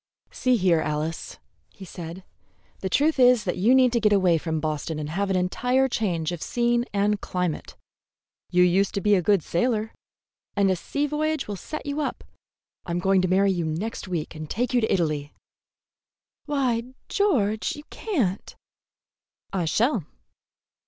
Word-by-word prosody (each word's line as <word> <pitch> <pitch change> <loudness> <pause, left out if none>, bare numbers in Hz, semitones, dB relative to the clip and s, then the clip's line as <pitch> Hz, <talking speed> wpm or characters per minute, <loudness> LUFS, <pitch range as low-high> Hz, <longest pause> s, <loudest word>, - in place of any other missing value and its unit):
"See 255 -1 +2
here, 180 -5 +3
Alice," 155 +1 -3 0.3
he 195 - -12
said, 170 +1 -8 0.6
"the 190 - -3
truth 295 - +2
is 250 -3 +6
that 180 - -2
you 225 +8 +4
need 255 -2 +5
to 235 - +3
get 210 -1 +3
away 185 -5 +4
from 160 0 -2
Boston 155 0 -3
and 150 0 -4
have 195 +4 -1
an 190 - +1
entire 250 +9 +1
change 175 -9 -1
of 175 -2 -5
scene 240 0 +1
and 205 0 +1
climate. 180 -3 -3 0.7
You 180 0 +4
used 185 +2 +2
to - - +1
be 210 +2 +3
a 190 - +4
good 195 -1 +2
sailor, 220 +4 0 0.6
and 200 -1 +3
a - - +2
sea 285 - -2
voyage 305 0 -1
will 205 - -3
set 305 +10 -7
you 285 +1 -2
up. - - -3 0.6
I'm 170 0 -3
going 190 +1 +3
to 185 - +1
marry 195 +2 +3
you 175 -2 -1
next 170 +8 -3
week 170 -4 -3
and 155 -1 -8
take 245 +2 -1
you 245 - +3
to 220 - 0
Italy." 150 -5 -1 1.1
"Why, 255 -4 -1
George, 220 - +1
you 295 - -10
can't!" 245 - -2 1.0
"I 180 -3 0
shall." 220 - +1
200 Hz, 165 wpm, -25 LUFS, 175-245 Hz, 1.1 s, is